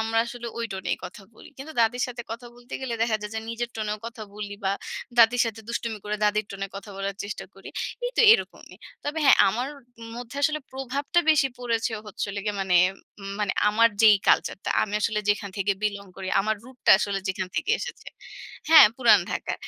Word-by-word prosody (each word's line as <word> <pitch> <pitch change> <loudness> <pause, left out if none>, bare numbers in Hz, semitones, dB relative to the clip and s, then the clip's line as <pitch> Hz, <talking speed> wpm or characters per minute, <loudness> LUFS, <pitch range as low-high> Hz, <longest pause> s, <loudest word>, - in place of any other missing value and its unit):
আমরা 225 0 0
আসলে 240 0 -7
ওই 230 - -1
টোনেই 190 -1 -2
কথা 180 +3 -9
বলি। - - -14
কিন্তু 300 +4 -8
দাদির 235 +2 +2
সাথে 245 -1 -7
কথা 240 +2 -6
বলতে 245 +1 -17
গেলে 250 -3 -3
দেখা 225 -2 +2
যায় 210 0 -6
যে 220 - -2
নিজের 235 +1 -4
টোনেও 210 -1 -3
কথা 230 -1 -8
বলি 205 -1 -6
বা 195 - +2 0.5
দাদির 235 +1 +6
সাথে 225 -1 -5
দুষ্টুমি 230 -2 -3
করে 210 0 -2
দাদির 210 0 +2
টোনে 195 0 -4
কথা 200 +1 -9
বলার 195 0 -3
চেষ্টা 205 - -6
করি। - - -12 0.4
এই - - -1
তো - - +4
এরকমই। 460 - -2 0.3
তবে 295 +2 -2
হ্যাঁ, 275 - +7
আমার 245 +7 -2 0.5
মধ্যে 245 +2 -8
আসলে 305 +1 +2
প্রভাবটা 270 +5 -1
বেশি 275 -3 +4
পড়েছে 230 -1 -1
হচ্ছে 210 - -4
হলো 205 - -4
গিয়ে 210 -1 -2
মানে 185 -2 +2 0.4
উম 195 0 -7
মানে 205 -3 0 0.2
আমার 230 +2 +5
যেই 215 -2 +8
কালচারটা, 190 - +2
আমি 210 -1 -3
আসলে 215 0 0
যেখান 205 -1 0
থেকে 200 0 +1
বিলং 200 -1 -2
করি, 190 -1 -6
আমার 215 +2 0
রুটটা 255 -1 -1
আসলে 200 -2 -1
যেখান 185 -1 -2
থেকে - - -1
এসেছে 480 - -7 0.6
হ্যাঁ, 320 -8 +10
পুরাণ 230 -6 +6
ঢাকা। - - -3
220 Hz, 200 wpm, -25 LUFS, 205-245 Hz, 0.6 s, হ্যাঁ